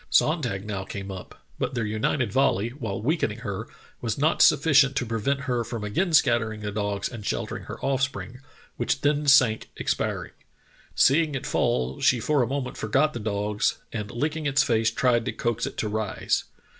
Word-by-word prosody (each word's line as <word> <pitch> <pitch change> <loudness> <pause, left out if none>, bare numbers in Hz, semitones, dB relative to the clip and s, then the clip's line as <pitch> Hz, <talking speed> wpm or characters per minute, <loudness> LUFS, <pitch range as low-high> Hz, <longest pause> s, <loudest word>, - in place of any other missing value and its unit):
"Sonntag 125 - +1
now 100 -2 -3
came 100 +1 -6
up, 95 -1 -10
but - - -2
their 115 -2 -1
united 110 +2 -1
volley, 120 -5 +2
while 115 -6 -5
weakening 125 -6 0
her, 105 -1 -4 0.3
was 115 -3 -2
not 155 +4 +2
sufficient 140 -4 +5
to 125 - 0
prevent 115 +5 -1
her 125 -4 -1
from 115 -1 -5
again 170 - 0
scattering 115 -7 +3
the 105 0 -3
dogs 100 -1 -2
and 115 -4 -8
sheltering - - -3
her - - -8
offspring, 135 -2 -2 0.4
which 125 +1 -1
then 145 0 +1
sank 125 -6 +5
expiring. - - -2 0.6
Seeing 150 +1 +4
it 135 - -4
fall, 65 +1 0
she 125 - +4
for 145 +4 +1
a 120 - +1
moment 135 0 -3
forgot 140 +8 +1
the 120 - -4
dogs, 105 -1 -1 0.2
and 105 -2 -4
licking 150 +6 -2
its 135 0 +3
face 115 -4 +2
tried 120 0 +2
to - - -1
coax 115 -1 -2
it - - -8
to 110 - -1
rise. 105 -1 -1
120 Hz, 180 wpm, -25 LUFS, 105-140 Hz, 0.6 s, sufficient